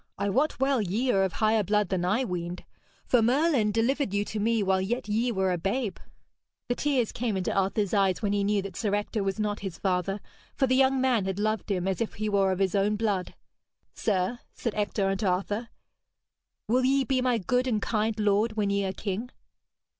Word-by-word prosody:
I 200 - -1
wot 280 +7 +1
well 270 -2 +2
ye 215 +7 0
are 195 - +3
of 190 -3 -1
higher 220 +4 +2
blood 210 0 +1
than 185 -2 -1
I 210 +9 +1
weened. 175 -3 -4 0.4
For 245 - +3
Merlin 250 -2 +2
delivered 230 0 0
you 205 +1 +1
to 215 - -4
me 225 0 +1
while 190 -1 +2
yet 230 +5 -2
ye 225 +4 +1
were 190 -3 +1
a 175 - -1
babe.' 200 +2 -2 0.7
The - - +3
tears 260 -4 0
came 225 -4 -2
into 185 - -1
Arthur's 195 +1 0
eyes 195 -3 +2
when 205 -2 0
he 200 -1 +1
knew 200 -1 +1
that 195 -3 -7
Sir 205 -3 0
Ector 205 +1 -2
was 195 +2 -2
not 210 0 -1
his 195 -3 -6
father, 190 +1 -1 0.4
for 275 - +2
the 255 - +1
young 265 0 +4
man 250 -6 +2
had 190 0 -2
loved 215 +1 -1
him 185 -2 0
as 190 +1 -1
if 230 - -2
he 215 +1 -2
were 195 -2 +2
of 185 - -1
his 190 -1 +1
own 205 +1 +2
blood. 205 -4 -1 0.6
'Sir,' 205 +3 -1 0.2
said 235 - -3
Ector 205 -1 -1
unto 195 +1 0
Arthur, 205 +5 -1 1.0
'will 250 +3 +2
ye 270 +1 +3
be 265 -1 0
my 250 -2 +2
good 250 +6 0
and 225 -4 +1
kind 215 +1 -1
lord 210 +2 +2
when 210 -2 0
ye 200 0 +1
are 190 - -2
king?' 205 +5 -4
210 Hz, 215 wpm, -27 LUFS, 195-235 Hz, 1.0 s, young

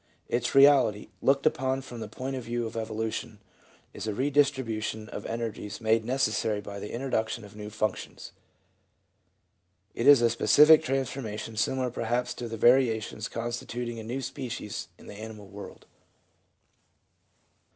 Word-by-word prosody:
Its 120 +1 -1
reality, 135 -7 +5
looked 140 0 +2
upon 135 -3 +1
from 125 -3 -9
the - - -5
point 135 +1 -5
of 130 - -5
view 120 0 -2
of 110 - -6
evolution, 110 -1 -3 0.6
is - - -6
a 105 - -2
redistribution 130 -6 0
of 100 - -6
energies 115 -3 -4
made 110 0 +2
necessary 110 -4 0
by 100 0 -7
the 105 - -7
introduction 115 -3 -2
of 100 - -14
new 105 0 -7
functions; 110 0 -4 1.6
it 115 - -1
is 145 -2 +9
a 115 - +5
specific 150 +8 +6
transformation 130 -6 -3
similar 130 +3 0
perhaps 120 +1 -1
to 120 - -6
the 115 0 -5
varia 120 -1 +5
tions 110 +1 -6
constituting 120 0 -4
a - - -7
new 125 +5 -4
species 125 -5 -5
in - - -16
the - - -9
animal 110 -1 -8
world. 100 +1 -11
115 Hz, 145 wpm, -28 LUFS, 110-130 Hz, 1.6 s, is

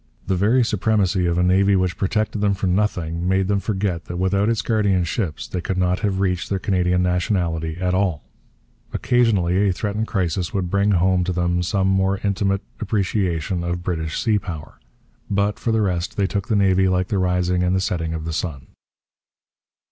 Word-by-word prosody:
The 95 - 0
very 110 +7 +3
supremacy 100 -4 +1
of 85 0 0
a 90 - +3
navy 95 +2 +3
which 90 -2 +1
protected 105 +1 -1
them 100 -1 +2
for 95 - -3
nothing 90 -3 0
made 95 0 +2
them 100 0 +1
forget 95 -4 -2
that 85 - -6
without 100 +3 +1
its 115 0 0
guardian 100 -6 +2
ships 85 -2 -3
they 90 - -4
could 95 +1 -3
not 90 0 +1
have 100 -4 -1
reached 90 -2 -1
their 100 - 0
Canadian 90 -2 +1
nationality 85 -3 -1
at 90 0 0
all. 95 -6 0 0.7
Occasionally 100 -5 +2
a - - +2
threatened 105 +4 -2
crisis 90 -2 -1
would 90 -3 -1
bring 100 +1 +2
home 90 0 +2
to 90 - -1
them 90 0 0
some 95 +2 0
more 95 0 +2
intimate 100 -1 0 0.2
appreciation 95 -5 -1
of 85 0 -3
British 80 -3 -2
sea 110 -2 +2
power. 80 -7 -8 0.5
But, 100 0 0
for 115 - -1
the 110 -1 +2
rest, 90 -3 -2
they 100 - +2
took 100 0 -2
the 110 - +1
Navy 95 -1 +3
like 90 0 0
the 100 - 0
rising 90 0 +1
and 90 +1 +1
the - - +2
setting 85 -3 -2
of 80 -1 -5
the 80 - -3
sun. 70 -6 -4
95 Hz, 190 wpm, -21 LUFS, 90-100 Hz, 0.7 s, very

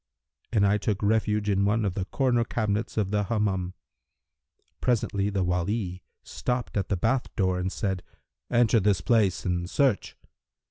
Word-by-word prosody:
and 105 -3 +3
I 100 +1 +3
took 105 -1 -1
refuge 105 0 +1
in 100 -1 +2
one 105 +2 +2
of 95 - 0
the 90 0 -3
corner 120 +1 +1
cabinets 110 -1 -2
of 100 -3 0
the 105 -1 +1
Hammam. 95 -4 -1 1.1
Presently 105 -5 +1
the 100 -2 0
Wali 90 +1 -1 0.2
stopped 125 0 -3
at 100 -3 -1
the 100 - +1
bath 120 +7 +1
door 95 -3 +1
and 95 +1 -2
said, 95 -3 -2 0.5
'Enter 120 -1 +4
this 100 -3 +2
place 105 -2 +2
and 90 -1 -1
search.' 135 -5 +1
105 Hz, 155 wpm, -27 LUFS, 95-110 Hz, 1.1 s, Enter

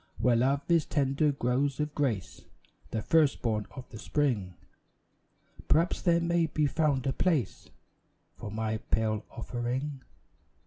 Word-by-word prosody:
Where 125 -1 +3
love 135 +4 +2
is 170 -3 +3
tending 145 +1 +1
growths 135 +2 0
of 150 0 -1
grace, 120 - -2 0.4
The 110 - -3
first 155 -4 +3
born 110 -3 0
of 130 -2 -10
the 110 - -9
Spring, 115 -12 -1 1.1
Perhaps 165 +3 +2
there 170 -1 +3
may 170 -1 +1
be 155 0 0
found 145 -3 +1
a 135 - +1
place 150 - 0 0.7
For - - -7
my 110 +1 -2
pale 110 -1 -1
offering. 125 +4 -4
135 Hz, 135 wpm, -29 LUFS, 115-150 Hz, 1.1 s, Where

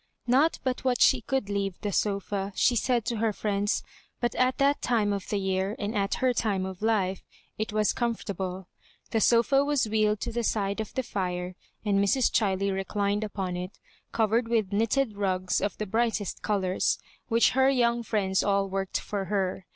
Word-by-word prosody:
Not 275 +7 +3
but 255 -1 -2
what 255 -2 +1
she 260 - +5
could 265 -1 -1
leave 200 -2 -2
the 205 - -2
S0&, 200 0 -1
she 245 - +3
said 240 -1 +1
to 235 -3 -1
her 225 0 +1
friends, 205 0 -1 0.4
but 240 -1 0
at 255 0 +1
that 280 +1 +2
time 215 -4 +1
of 200 -1 -5
the 205 - 0
year, 190 +1 -1
and 210 +2 -3
at 200 -1 0
her 255 -1 +1
time 200 -5 0
of 190 0 -7
life, 200 -4 +1 0.4
it 215 0 -2
was 215 0 +2
comfort 235 -2 -2
able. 185 -1 -5 0.4
The 225 - +1
sofa 235 +5 +4
was 285 -5 +1
wheeled 215 -1 +1
to 235 - -3
the 235 +1 -2
side 200 -2 -1
of 220 - -6
the 260 - 0
fire, 180 -5 -3 0.3
and 200 -1 +2
Mrs. 245 +5 +2
Chiley 195 -2 +1
reclined 200 +2 -1
upon 195 -4 -3
it, 180 +2 -6 0.3
covered 225 +1 +1
with 220 -4 0
knitted 225 +1 +1
rugs 185 -2 0
of 205 - -2
the 215 - -3
brightest 220 -1 -1
colours, 190 -3 0 0.3
which 230 -1 +4
her 265 +1 +4
young 240 -3 +2
friends 200 -4 0
all 200 -1 +1
worked 195 0 -2
for 200 -2 -4
her. 190 -1 -2
210 Hz, 190 wpm, -27 LUFS, 195-235 Hz, 0.4 s, she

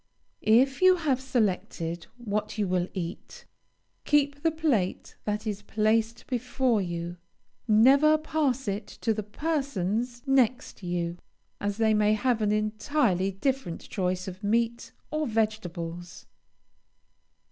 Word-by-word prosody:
If 260 +7 +4
you 370 0 +7
have 290 -7 0
selected 185 -9 -1
what 215 -2 -3
you 205 -2 +1
will 180 -1 0
eat, 175 -2 -6 0.6
keep 285 -1 +2
the 325 - +3
plate 295 - -1
that 210 +1 -2
is 205 -2 -3
placed 220 +2 0
before 250 -2 0
you; 175 -1 -4 0.5
never 270 +8 +6
pass 295 -5 -1
it 200 +1 -2
to 225 - +2
the 215 - -3
persons 240 - -2
next 260 -4 +1
you, 175 -1 -3 0.4
as 205 0 -2
they 220 -1 +3
may 210 0 +3
have 235 +1 +1
an 210 -1 +2
entirely 215 -2 +1
different 225 -1 -2
choice 185 -2 -1
of 185 +1 -8
meat 230 +3 0 0.2
or 310 0 -1
vegetables. 175 -6 -3
220 Hz, 125 wpm, -27 LUFS, 195-265 Hz, 0.6 s, you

